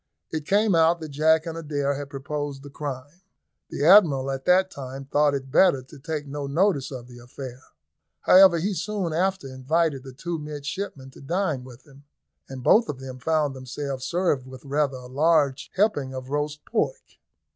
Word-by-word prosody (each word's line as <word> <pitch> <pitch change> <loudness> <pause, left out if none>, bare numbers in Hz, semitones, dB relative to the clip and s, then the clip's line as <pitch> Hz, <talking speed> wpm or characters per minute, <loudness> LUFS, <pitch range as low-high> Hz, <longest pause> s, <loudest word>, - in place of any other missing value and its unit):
It 155 -2 -4
came 205 0 +3
out 165 +1 +4
that 160 -1 -7
Jack 160 +3 +3
and 165 -1 -5
Adair 145 -3 -1
had 140 0 -6
proposed 140 0 -5
the 145 - -11
crime. 145 +3 -7 0.5
The 145 - -2
Admiral 155 -8 +6
at 135 0 -5
the 185 +1 +4
time 135 -4 -8
thought 145 +1 +2
it 135 -1 -6
better 140 -5 +4
to 140 +3 -15
take 150 +1 -4
no 140 0 -5
notice 150 -2 +1
of 125 -3 -8
the 120 -1 -13
affair. 125 +1 -9 0.6
However, 185 -2 +7
he 195 +5 -1
soon 195 -3 -2
after 190 -2 0
invited 135 +3 0
the 135 - -9
two 165 +5 -4
midshipmen 145 -1 -6
to - - -15
dine 160 -2 -1
with 125 0 -14
him, 140 -1 -18 0.4
and 130 -2 -8
both 225 - +5
of 135 - -4
them 130 -1 -8
found 150 0 0
themselves 130 +1 -5
served 170 -7 0
with 130 +1 -12
rather 140 -1 0
a 125 - -11
large 145 +1 +1
helping 145 -10 +1
of 130 +1 -7
roast 150 0 -3
pork. - - -3
145 Hz, 180 wpm, -25 LUFS, 135-165 Hz, 0.6 s, However